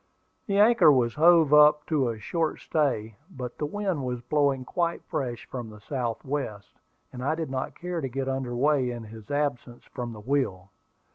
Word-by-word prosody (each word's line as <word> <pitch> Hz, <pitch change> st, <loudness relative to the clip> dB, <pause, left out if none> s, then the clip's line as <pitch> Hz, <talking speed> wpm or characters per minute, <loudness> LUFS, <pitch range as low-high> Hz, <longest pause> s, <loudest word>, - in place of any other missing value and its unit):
The 200 Hz, -1 st, 0 dB
anchor 215 Hz, -5 st, +6 dB
was 120 Hz, -4 st, +2 dB
hove 160 Hz, -2 st, +5 dB
up 150 Hz, 0 st, +6 dB
to 140 Hz, -6 st, +1 dB
a 115 Hz, -, -4 dB
short 160 Hz, +9 st, -2 dB
stay; 115 Hz, -9 st, -1 dB
but 125 Hz, -9 st, -7 dB
the 150 Hz, -, -1 dB
wind 190 Hz, -4 st, -2 dB
was 125 Hz, -1 st, -3 dB
blowing 140 Hz, 0 st, 0 dB
quite 170 Hz, +4 st, -1 dB
fresh 120 Hz, -3 st, -4 dB
from 120 Hz, -3 st, -6 dB
the 105 Hz, 0 st, -12 dB
south 120 Hz, +2 st, -4 dB
west, 130 Hz, -8 st, -4 dB, 0.4 s
and 125 Hz, 0 st, -6 dB
I 150 Hz, +4 st, +1 dB
did 160 Hz, -4 st, -4 dB
not 130 Hz, 0 st, -4 dB
care 175 Hz, -1 st, -3 dB
to 135 Hz, -, -3 dB
get 135 Hz, +1 st, -3 dB
under 130 Hz, -2 st, -2 dB
way 135 Hz, 0 st, +2 dB
in 120 Hz, -1 st, -5 dB
his 110 Hz, -1 st, -12 dB
absence 140 Hz, -4 st, -2 dB
from 120 Hz, -1 st, -6 dB
the 110 Hz, -, -10 dB
wheel. 105 Hz, -8 st, -1 dB
135 Hz, 190 wpm, -27 LUFS, 120-150 Hz, 0.4 s, anchor